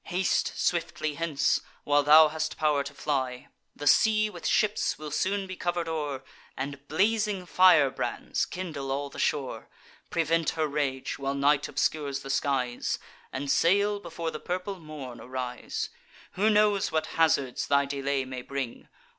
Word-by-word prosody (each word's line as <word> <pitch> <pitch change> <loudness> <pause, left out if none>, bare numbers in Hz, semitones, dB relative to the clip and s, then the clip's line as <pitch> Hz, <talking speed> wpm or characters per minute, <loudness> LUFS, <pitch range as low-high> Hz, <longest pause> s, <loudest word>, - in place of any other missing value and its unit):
Haste 185 +1 0
swiftly 165 -3 -1
hence, 155 -1 +1 0.2
while 145 0 +3
thou 155 +2 +8
hast 155 0 -3
pow'r 150 -3 +2
to 140 - -7
fly. 130 -4 -2 0.3
The 145 - -7
sea 215 +7 +4
with - - -5
ships 215 -1 +1
will 150 -1 -7
soon 195 +6 0
be 185 0 -7
cover'd 175 -1 -2
o'er, 145 -4 -3 0.3
And 140 +1 -5
blazing 205 +2 +1
firebrands 175 -7 +3
kindle 155 -7 -5
all 140 +1 -2
the - - -9
shore. 140 -4 -1 0.4
Prevent 165 -1 +1
her 160 - +2
rage, 140 -3 -2
while 135 0 -2
night 145 +1 +3
obscures 140 -3 -1
the 135 - -5
skies, 130 -4 0 0.3
And 135 +1 -2
sail 200 +4 +3
before 170 -3 -5
the 155 - -6
purple 185 +2 -4
morn 150 -6 -8
arise. 125 -1 -4 0.4
Who 210 +4 +2
knows 210 -2 +3
what 155 0 0 0.2
hazards 140 -5 +2
thy 140 0 +3
delay 140 -1 -1
may 130 -1 -6
bring? 135 -2 -5
150 Hz, 150 wpm, -28 LUFS, 140-175 Hz, 0.4 s, thou